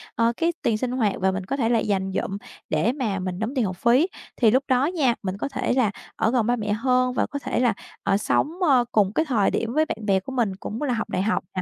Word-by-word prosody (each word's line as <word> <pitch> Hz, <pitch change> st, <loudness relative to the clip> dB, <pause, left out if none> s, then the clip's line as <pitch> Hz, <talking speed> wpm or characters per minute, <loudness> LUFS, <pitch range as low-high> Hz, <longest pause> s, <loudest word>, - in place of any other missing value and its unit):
ờ, 230 Hz, 0 st, +2 dB
cái 340 Hz, +1 st, +1 dB
tiền 220 Hz, -, +1 dB
sinh 245 Hz, +2 st, -2 dB
hoạt 225 Hz, -6 st, +1 dB
và 190 Hz, 0 st, +2 dB
mình 190 Hz, 0 st, -4 dB
có 275 Hz, -, -2 dB
thể 230 Hz, -4 st, +1 dB
là 235 Hz, -1 st, +3 dB
dành 195 Hz, -3 st, -1 dB
dụm 195 Hz, -, -2 dB, 0.3 s
để 235 Hz, -, +2 dB
mà 235 Hz, -8 st, -2 dB
mình 185 Hz, -1 st, -4 dB
đóng 220 Hz, +4 st, -2 dB
tiền 250 Hz, -4 st, +2 dB
học 185 Hz, -2 st, -4 dB
phí. 245 Hz, -, +4 dB, 0.3 s
Thì 225 Hz, -4 st, +4 dB
lúc 260 Hz, +4 st, +3 dB
đó 255 Hz, 0 st, +3 dB
nha, 295 Hz, -9 st, +1 dB
mình 190 Hz, 0 st, -3 dB
có 245 Hz, -, -3 dB
thể -, -, -1 dB
là 245 Hz, -6 st, +2 dB, 0.2 s
ở 220 Hz, -, +1 dB
gần 240 Hz, -4 st, +1 dB
ba 245 Hz, -, +3 dB
mẹ 210 Hz, -3 st, -2 dB
hơn 250 Hz, +2 st, +1 dB
và -, -, +1 dB
có 285 Hz, -, -5 dB
thể 265 Hz, -2 st, -2 dB
là, 245 Hz, -3 st, +3 dB, 0.3 s
ờ, 200 Hz, 0 st, +2 dB
sống, 285 Hz, +7 st, +1 dB
ơ, 265 Hz, -7 st, +4 dB
cùng 205 Hz, -2 st, +2 dB
cái 320 Hz, -, +1 dB
thời 230 Hz, -9 st, +2 dB
điểm 230 Hz, 0 st, -2 dB
với 310 Hz, +2 st, +3 dB
bạn -, -, -4 dB
bè 195 Hz, -2 st, +3 dB
của 195 Hz, -, -9 dB
mình 230 Hz, -7 st, 0 dB
cũng 210 Hz, +5 st, -6 dB
là 280 Hz, -4 st, 0 dB
học 230 Hz, -1 st, -3 dB
đại -, -, -1 dB
học 215 Hz, +3 st, 0 dB
nè, 185 Hz, -, 0 dB
230 Hz, 280 wpm, -24 LUFS, 200-255 Hz, 0.3 s, phí